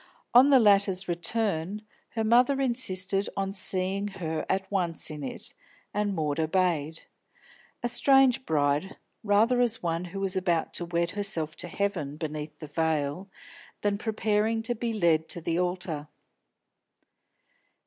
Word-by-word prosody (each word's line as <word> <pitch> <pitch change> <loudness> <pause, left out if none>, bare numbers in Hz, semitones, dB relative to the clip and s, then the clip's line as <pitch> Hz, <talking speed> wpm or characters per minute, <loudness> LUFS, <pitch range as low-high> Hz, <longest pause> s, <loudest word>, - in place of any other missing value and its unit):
On 255 +4 +7
the 275 - +7
latter's 200 -4 +4
return, 185 +2 -1 0.3
her 225 - 0
mother 245 +5 +4
insisted 200 -7 +1
on 195 0 -1
seeing 190 +1 -1
her 165 -5 -4
at 190 0 0
once 175 -5 -1
in 150 -1 -7
it, 130 - -4 0.4
and 205 -1 -1
Maud 150 -2 -1
obeyed. 160 -2 0 0.8
A - - +2
strange 265 0 +4
bride, 150 - 0 0.3
rather 220 +4 +3
as 230 -4 +1
one 170 +1 -1
who 185 +3 -7
was 195 -1 -1
about 175 -3 0
to 175 - -2
wed 170 0 -1
herself 185 -6 -3
to - - -6
Heaven 175 -7 -2
beneath 150 -1 -5
the 155 - -8
veil, 155 +3 -1 0.5
than 205 -1 0
preparing 220 0 0
to 240 - 0
be 235 0 -3
led 170 -7 +1
to - - -1
the 165 +1 -1
altar. 175 -4 -2
185 Hz, 140 wpm, -27 LUFS, 160-210 Hz, 0.8 s, On